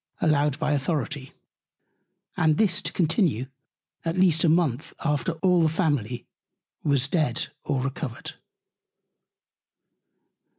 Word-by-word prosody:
allowed 150 -3 +2
by 155 -1 0
Authority: 145 -1 -2 1.0
And 155 -1 +2
this 195 -6 +2
to - - -3
continue 165 - +1 0.6
at 165 +2 -2
least 175 -4 +4
a 170 - +4
Month 155 -5 +1
after 150 +2 0
all 180 -2 +4
the 160 - +4
Family 145 - -1 0.6
was 140 -2 +2
dead 145 -7 0
or 135 -2 -1
recovered. 130 -1 -5
150 Hz, 110 wpm, -25 LUFS, 135-165 Hz, 1.0 s, least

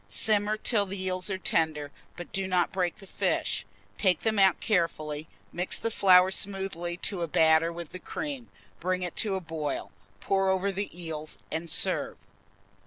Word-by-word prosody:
Simmer 210 - +1
till 210 -2 +2
the 195 +1 -5
eels 185 +1 -1
are 190 - -1
tender, 155 -5 0 0.3
but 175 - -8
do 195 -1 0
not 180 -2 +1
break 180 -2 -1
the 205 - -13
fish. - - -1 0.3
Take 185 -4 +3
them 220 -2 +1
out 190 -2 +5
carefully, 155 -6 -1 0.3
mix 180 +1 0
the 230 - -2
flour 185 -2 +6
smoothly 190 -3 -2
to 195 -4 0
a 170 - 0
batter 160 +1 +4
with 170 -2 -8
the 185 - -7
cream, 275 +3 -5 0.3
bring 185 +1 -1
it 180 - -4
to 205 -4 0
a - - -1
boil, 160 -4 -4 0.3
pour 195 - +1
over 190 +1 +1
the 195 +1 -3
eels, 155 -2 -4
and 165 +1 -3
serve. - - +2
185 Hz, 175 wpm, -28 LUFS, 165-195 Hz, 0.3 s, flour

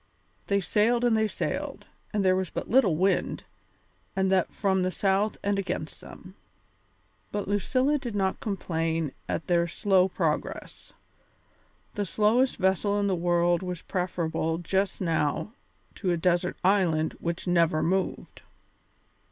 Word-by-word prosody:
They 200 0 +2
sailed 230 +6 +2
and 235 -2 +3
they 220 0 +2
sailed, - - -4 0.3
and 205 -3 0
there 185 0 +5
was 185 -1 -1
but - - -5
little 225 -10 +4
wind, 190 +4 0 0.7
and 190 0 +1
that 185 -2 +2
from 190 -2 +1
the 185 - +1
south 195 +3 0
and 200 0 +1
against 180 -5 -4
them. 185 0 -12 1.0
But 205 -2 -3
Lucilla 255 +9 +1
did 240 -5 -5
not 190 -1 0
complain 165 -6 -2 0.2
at - - -2
their 170 -1 +2
slow 190 +1 +3
progress. 190 - -3 1.0
The 205 -2 -2
slowest 225 +8 +2
vessel 195 +2 +1
in 205 - +1
the 195 -2 +1
world 175 0 +2
was 180 -2 -5
preferable 165 -3 -1
just 190 +3 -1
now 165 +3 0 0.5
to 190 - 0
a 175 - +2
desert 175 +1 +1
island 180 -5 +2
which 170 0 -3
never 170 -3 +2
moved. 190 +3 -2
190 Hz, 140 wpm, -27 LUFS, 170-205 Hz, 1.0 s, there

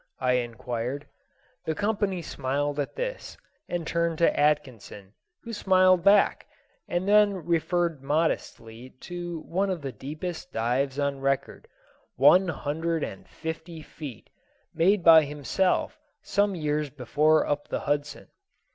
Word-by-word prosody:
I 125 -1 +1
inquired. 120 +2 -3 0.6
The 160 - -1
company 205 -4 -1
smiled 145 +1 -2
at 145 - -3
this, - - -5 0.3
and 175 -2 -3
turned 170 0 -1
to 170 - +2
Atkinson, 125 -9 -1 0.3
who 230 - -7
smiled 185 -3 +4
back, 200 +1 +4 0.4
and 175 +2 -2
then 205 -4 +4
referred 170 -2 0
modestly 130 -5 -2
to 175 -2 -6
one 195 +5 -1
of 180 -5 -3
the 135 - -4
deepest 155 - -6
dives 130 +4 -1
on 140 -1 -1
record, 135 0 -2 0.5
one 150 +9 +6
hundred 160 +1 -2
and 95 - -7
fifty 160 0 -7
feet, 145 -8 -10 0.4
made 185 +3 +3
by 160 -2 +8
himself 150 - -1 0.2
some 200 -1 +1
years 150 -2 -1
before 150 +4 +2
up 145 0 -2
the - - -3
Hudson. 145 0 -2
155 Hz, 130 wpm, -26 LUFS, 140-175 Hz, 0.6 s, by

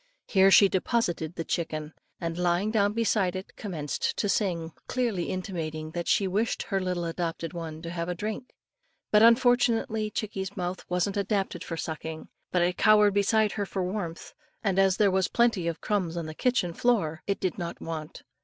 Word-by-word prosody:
Here 195 -1 +5
she 200 +1 +8
deposited 180 -5 -1
the 165 - -3
chicken, 155 -2 -3 0.3
and, 165 -1 -3
lying 180 +4 +1
down 205 -2 +2
beside 210 -5 +1
it, 185 +1 -7
commenced 160 -9 -3
to 205 - 0
sing, 175 -5 0 0.2
clearly 235 -9 -1
intimating 160 -5 -4
that 170 +1 -4
she 195 - +3
wished 210 +5 0
her 195 -2 -1
little 180 -2 -2
adopted 165 0 -3
one 160 -2 -6
to 170 - -5
have 170 0 -3
a 180 - -2
drink. 215 +7 -4 0.6
But 210 - +6
unfortunately, 230 -2 +4
chickie's 200 -2 -4
mouth 180 0 -3
wasn't 180 +3 0
adapted 200 -1 -1
for 165 - -5
sucking, 160 0 -5 0.2
but 180 -1 +3
it 175 +1 0
cowered 210 -2 +5
beside 210 +1 +3
her 205 -2 -2
for 190 -1 -2
warmth; 180 -3 -4 0.3
and 195 -3 +1
as 195 -1 +4
there 205 -2 +4
were 190 0 +2
plenty 230 -8 +2
of 170 -1 -3
crumbs 185 -5 -1
on 170 - -3
the 155 - -6
kitchen 180 -4 0
floor, 165 -9 +1
it 200 - 0
did 185 0 -2
not 170 -1 -5
want. 155 -2 -6
185 Hz, 180 wpm, -27 LUFS, 170-210 Hz, 0.6 s, she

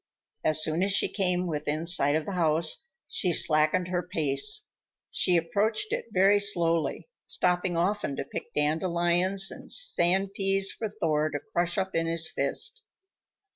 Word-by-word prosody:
As 155 0 +4
soon 160 +2 -1
as 195 +1 +1
she 200 - +3
came 180 -2 -1
within 155 -1 -3
sight 145 -4 +3
of 155 - -1
the - - -5
house, 165 - 0 0.2
she 180 - -1
slackened 155 +3 +2
her 180 -1 -1
pace. 160 - 0 0.5
She 180 -1 +1
approached 215 - -1
it 485 - -3
very 195 +1 +4
slowly, 170 -7 0 0.2
stopping 180 -1 0
often 185 -4 -1
to - - -4
pick - - -8
dandelions 175 +5 +1
and - - -8
sand 195 - +2
peas 195 0 +1
for 220 - -5
Thor 155 -7 -1
to 145 -1 -4
crush 175 0 0
up 190 -1 -2
in 165 0 -1
his 165 -1 +1
fist. 455 - -1
175 Hz, 155 wpm, -27 LUFS, 160-195 Hz, 0.5 s, As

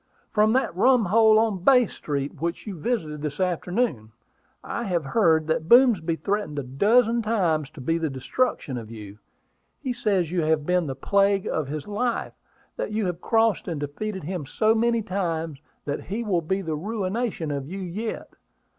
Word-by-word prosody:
"From 215 0 +3
that 260 -9 +1
rumhole 220 0 +5
in 190 -5 -5
Bay 250 +1 +6
Street 145 -4 -5
which 170 +1 -3
you 205 -4 -5
visited 155 -7 -2
this 145 -1 -4
afternoon. 180 - -1 0.5
I 235 - -4
have 175 -6 -1
heard 160 -1 +3
that 160 +1 -1
Boomsby 225 -10 +5
threatened 200 -4 -2
a 140 - -1
dozen 225 - +3
times 175 -10 0
to 150 - -11
be 165 +6 0
the 160 -2 -1
destruction 135 - -1
of 110 -2 -10
you. 105 -2 -10 0.6
He 255 - -3
says 200 -8 0
you 180 -1 +1
have 155 -1 +1
been 180 -1 +1
the 135 - -4
plague 200 +6 +2
of 155 -4 -2
his 150 +3 -5
life; 230 +4 -2 0.4
that - - -3
you 215 -1 -1
have 180 -1 -3
crossed 225 -2 +2
and 165 -5 -3
defeated 190 +7 -4
him 170 -3 -4
so 215 +8 +2
many 230 0 +1
times 165 -6 -3 0.2
that 145 0 -3
he 215 +5 -3
will 190 -6 +1
be 190 +4 -2
the 160 -3 -2
'ruination' 200 -1 -2
of 140 -1 -3
you 190 +4 -6
yet. 200 +5 -5
180 Hz, 175 wpm, -25 LUFS, 155-220 Hz, 0.6 s, Bay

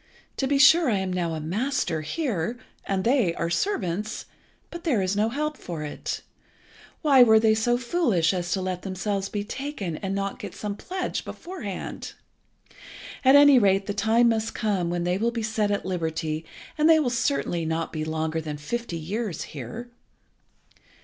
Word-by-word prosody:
To 270 - 0
be 280 +1 +2
sure 315 +2 +7
I 210 - +2
am 190 -1 -2
now 170 -3 -1
a - - -4
master 175 - -1
here, 230 - -2 0.3
and 190 -1 -1
they 230 -8 +2
are 170 0 -2
servants, 210 - -1 0.5
but 340 0 -7
there 275 -11 +2
is 190 +1 0
no 215 +2 +2
help 300 +4 -2
for 165 -4 -5
it. 150 - -5 0.8
Why 275 -4 +6
were 220 -2 +7
they 220 0 +4
so 240 +2 +2
foolish 235 - +1
as 175 -1 -3
to 190 - -1
let 185 -1 -3
themselves 195 +1 -2
be 205 -1 -3
taken 220 - -4
and 195 0 -3
not 195 0 -3
get - - -7
some 205 -1 -4
pledge 370 - -4
beforehand? 340 - -6 1.1
At 265 +1 +7
any 285 -2 +8
rate 195 -2 +3
the 205 - -2
time 225 +3 +3
must 225 -1 -1
come 195 -5 0
when 175 0 -1
they 180 +2 0
will 230 +2 +2
be 235 -1 -3
set 215 -1 0
at 205 -1 -1
liberty, 160 -3 -2 0.3
and 305 +2 +5
they 320 -1 +7
will 260 -5 +1
certainly 235 - 0
not 160 +1 -2
be 155 -1 -2
longer 160 +1 -2
than 150 -2 -5
fifty 205 +4 -4
years 190 +2 -3
here." 155 - -7
205 Hz, 175 wpm, -25 LUFS, 175-240 Hz, 1.1 s, any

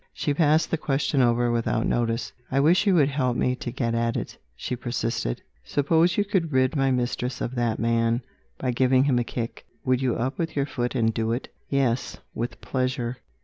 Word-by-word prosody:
She 145 - 0
passed 155 +1 +3
the 165 - 0
question 140 -1 +1
over 120 0 +3
without 115 -1 0
notice. 115 0 0 0.2
"I 135 - +1
wish 175 +8 +4
you 195 - +5
would 145 -4 +4
help 130 -3 0
me 125 - +1
to 120 - -5
get 115 -2 -1
at 115 0 0
it," - - -5 0.2
she 125 - -3
persisted. 120 - -2 0.2
"Suppose 160 +4 +2
you 205 - +2
could 190 -6 0
rid 130 +1 +2
my 135 -1 +2
mistress 125 0 -1
of 120 - -3
that 120 -3 0
man 115 +1 +1 0.3
by 130 - -1
giving 130 +1 +3
him 135 -3 +2
a - - +1
kick, 115 0 -5 0.2
would 130 0 +2
you 130 -3 +1
up 130 +3 -2
with 165 -1 -2
your 140 -1 +1
foot 125 -2 -3
and 115 -2 +2
do 115 0 0
it?" 120 - -4 0.2
"Yes 130 -3 0 0.2
with 120 +1 -4
pleasure." 130 -2 -2
125 Hz, 200 wpm, -25 LUFS, 120-140 Hz, 0.3 s, you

